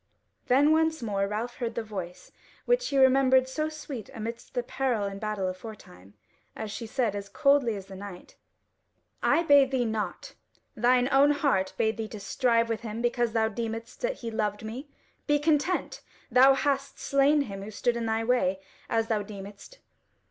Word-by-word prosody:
Then 280 +4 +4
once 320 -3 +2
more 200 -3 0
Ralph 220 +4 -4
heard 235 -2 -3
the 230 - -2
voice, 185 -5 -7 0.3
which - - +2
he 280 - -1
remembered 260 -1 +5
so 310 +4 -2
sweet 290 -7 -8
amidst 230 +3 -7
peril 250 -5 -1
and 200 0 -5
battle 210 -3 -2
aforetime, 185 - -9 0.4
as 220 -1 -5
she 220 +2 -6
said 220 -3 -1
as 200 0 -6
coldly 275 -2 +3
as 195 -2 -7
the 195 - -11
Knight: 190 -2 -10 0.9
"I 335 - +3
bade 285 -4 +6
thee 260 -2 0
not: 215 -5 -4 0.4
thine 245 +2 +3
own 275 +2 +5
heart 280 -10 +1
bade 220 0 +1
thee 220 -1 -3
to 215 - -8
strive 230 +2 +1
with 225 -1 -3
him 230 0 -5
because 240 -1 0
thou 220 -1 +2
deemedst 225 +1 -5
that - - -3
he 230 - -3
loved 210 -1 -2
me. 255 +7 -7 0.4
Be 295 -1 +4
content! 300 +4 0 0.3
thou 260 +3 +7
hast 275 0 -1
slain 280 +2 +3
him 200 -7 -5
who 200 - -7
stood 235 +3 -1
in 230 -1 -2
thy 225 0 0
way, 225 -6 +1 0.3
as 225 0 +1
thou 220 -2 0
deemedst. 200 - -10
230 Hz, 175 wpm, -28 LUFS, 210-270 Hz, 0.9 s, thou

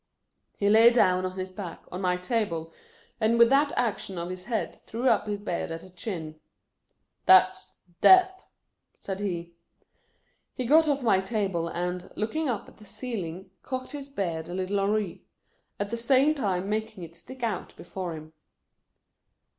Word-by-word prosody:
He 200 - +1
laid 225 +3 +7
down, 185 -5 +3
on 185 +1 -8
his 185 0 -4
back, 185 -3 -7
on 180 - -5
my 180 -1 +1
table, 180 -5 -2 0.5
and 225 +1 +2
with 235 +1 +6
that 285 +1 +4
action 200 -5 -1
of 170 +1 -4
his 185 0 -7
head 230 -3 -2
threw 235 +4 -4
up 215 - +3
his 205 -1 -1
beard 200 -4 -3
at 165 0 -5
the 185 - -14
chin. 165 -5 -6 0.4
" - - -42
That 185 0 +7
's 185 0 -12 0.3
death! 375 0 +6 0.3
" - - -46
said 195 -1 -5
he. 170 -4 -4 1.0
He 255 - -3
got 310 +5 +5
off 280 -2 0
my 215 -5 +4
table 190 -5 -1
and, 180 +1 -4
looking 280 +8 -1
up 230 -5 -3
at - - -17
the 215 - -15
ceiling, 195 -4 -5
cocked 255 -1 -5
his 280 -1 -7
beard 170 - -3
a 175 - -5
little 190 +2 -1
awry; 200 -2 0 0.6
at 205 +1 -3
the 235 - -1
same 265 +5 +4
time 195 -9 -1
making 215 -2 -3
it 165 -1 -10
stick 260 +5 -11
out 220 -5 -3
before 180 -3 -5
him. 155 0 -11
200 Hz, 175 wpm, -27 LUFS, 180-235 Hz, 1.0 s, laid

